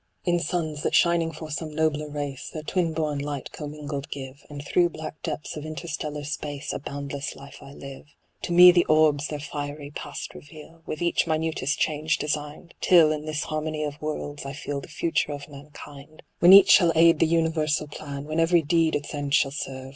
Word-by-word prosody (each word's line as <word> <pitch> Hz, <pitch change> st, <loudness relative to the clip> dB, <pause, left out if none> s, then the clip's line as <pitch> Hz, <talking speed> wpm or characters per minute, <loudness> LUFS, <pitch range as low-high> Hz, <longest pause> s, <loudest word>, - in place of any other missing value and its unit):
In 175 Hz, 0 st, +2 dB
suns, 155 Hz, -2 st, -2 dB
that -, -, 0 dB
shining 170 Hz, -1 st, +3 dB
for 155 Hz, 0 st, -9 dB
some 155 Hz, +1 st, -4 dB
nobler 155 Hz, -1 st, 0 dB
race 145 Hz, -2 st, -5 dB
Their 155 Hz, -, -7 dB
twin 170 Hz, 0 st, 0 dB
born 155 Hz, -2 st, -2 dB
light 145 Hz, -1 st, -5 dB
commingled 145 Hz, -2 st, -6 dB
give, 135 Hz, 0 st, -8 dB
And 145 Hz, -1 st, -8 dB
through 175 Hz, +2 st, +3 dB
black 155 Hz, -1 st, -8 dB
depths 150 Hz, -1 st, -5 dB
of 150 Hz, -, -6 dB
interstellar 155 Hz, -2 st, -5 dB
space 145 Hz, -1 st, -5 dB
A -, -, -3 dB
boundless 140 Hz, 0 st, -5 dB
life 140 Hz, 0 st, -12 dB
I 140 Hz, 0 st, -12 dB
live. 140 Hz, 0 st, -10 dB, 0.3 s
To -, -, -4 dB
me 180 Hz, +1 st, +9 dB
the 175 Hz, -1 st, +4 dB
orbs 155 Hz, -1 st, +3 dB
their 150 Hz, -, -5 dB
fiery 145 Hz, 0 st, -6 dB
past 145 Hz, 0 st, -7 dB
reveal. 155 Hz, +2 st, -13 dB
With 155 Hz, -, -4 dB
each 170 Hz, 0 st, +1 dB
minutest 155 Hz, -2 st, -1 dB
change 150 Hz, -1 st, 0 dB
designed; 150 Hz, +3 st, -4 dB
Till, 165 Hz, -4 st, +6 dB
in 155 Hz, 0 st, -3 dB
this 155 Hz, 0 st, -2 dB
harmony 155 Hz, 0 st, -3 dB
of 145 Hz, -1 st, -5 dB
worlds, 145 Hz, -1 st, -4 dB
I 140 Hz, 0 st, -6 dB
feel 145 Hz, 0 st, -5 dB
The -, -, -11 dB
future 165 Hz, -1 st, -1 dB
of 145 Hz, 0 st, -8 dB
mankind. 145 Hz, +1 st, -12 dB, 0.2 s
When 175 Hz, -, +7 dB
each 195 Hz, 0 st, +9 dB
shall 175 Hz, -4 st, +6 dB
aid 165 Hz, 0 st, +5 dB
the 165 Hz, -, +4 dB
universal 160 Hz, -2 st, +1 dB
plan, 140 Hz, -1 st, -7 dB
AVhen 155 Hz, +2 st, -2 dB
every 165 Hz, 0 st, +4 dB
deed 160 Hz, +1 st, +2 dB
its 145 Hz, +1 st, -4 dB
end 145 Hz, -1 st, 0 dB
shall 135 Hz, -, +3 dB
serve. 135 Hz, -2 st, -6 dB
150 Hz, 195 wpm, -25 LUFS, 145-160 Hz, 0.3 s, me